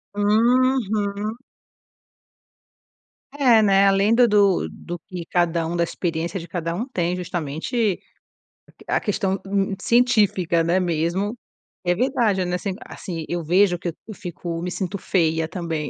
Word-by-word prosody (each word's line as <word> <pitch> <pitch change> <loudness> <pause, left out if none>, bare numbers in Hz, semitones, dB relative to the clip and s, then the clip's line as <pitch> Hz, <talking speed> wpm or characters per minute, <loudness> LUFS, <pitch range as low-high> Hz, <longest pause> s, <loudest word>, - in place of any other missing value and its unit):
Uhum. 215 -1 +1 1.9
É, 260 -6 +4
né, 195 -1 +5
além 195 +3 +3
da 245 +1 +6
do 205 -4 +3
do 175 0 -8
que 180 -2 -6
cada 170 -1 +1
um 165 +2 -3
da 170 - +2
experiência 170 +1 -3
de 170 - -9
cada 170 -1 -3
um 230 +8 -3
tem 180 -8 -1
justamente, 180 - -2 0.7
a - - -20
que - - -18
a - - +1
questão 200 -2 -1
n 195 0 0
científica, 205 -8 +3
né, 170 +3 +2
mesmo, 175 +4 -1 0.5
é 175 -1 +2
verdade, 220 -4 +1
né, 180 0 -1
assim 190 +2 -3
assim, 165 -4 -6
eu 175 -1 -3
vejo 180 +3 +3
que 175 - -4 0.2
eu 220 - -7
fico 175 -3 -6
me 180 +1 -3
sinto 190 +1 -3
feia 160 -4 0
também, 160 -3 -4
185 Hz, 145 wpm, -22 LUFS, 170-210 Hz, 1.9 s, da